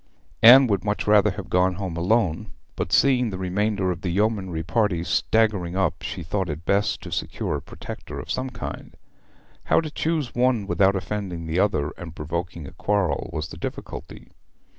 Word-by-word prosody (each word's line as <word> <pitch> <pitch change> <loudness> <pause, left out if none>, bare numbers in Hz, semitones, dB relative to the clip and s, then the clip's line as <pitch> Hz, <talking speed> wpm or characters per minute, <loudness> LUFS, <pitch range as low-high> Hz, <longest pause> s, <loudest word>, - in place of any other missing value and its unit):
Anne 125 +4 +10
would 100 -6 0
much 105 0 -1
rather 105 0 +5
have 100 0 -6
gone 90 +1 +2
home 95 -3 -4
alone, 95 +1 +1 0.2
but 85 - -3
seeing 125 +3 +4
the 95 - -5
remainder 95 +1 0
of 85 -1 -5
the 90 - -2
yeomanry 95 -3 0
party 100 -2 +1
staggering 100 -3 +1
up 95 -4 0
she 90 - -5
thought 95 +2 -2
it 80 +3 -5
best 100 +2 +1
to - - -8
secure - - -2
a - - -7
protector - - -8
of - - -6
some 130 +1 -2
kind. - - -7 0.7
How - - +4
to 155 -2 -4
choose 155 -5 -1
one 120 -4 +2
without 100 0 +3
offending 95 -3 -4
the 80 +3 -1
other 75 -8 +1
and 85 -3 -8
provoking 85 +1 -4
a - - -9
quarrel 100 -8 -1
was 75 +1 -4
the - - -9
difficulty. - - -7
95 Hz, 180 wpm, -24 LUFS, 85-105 Hz, 0.7 s, Anne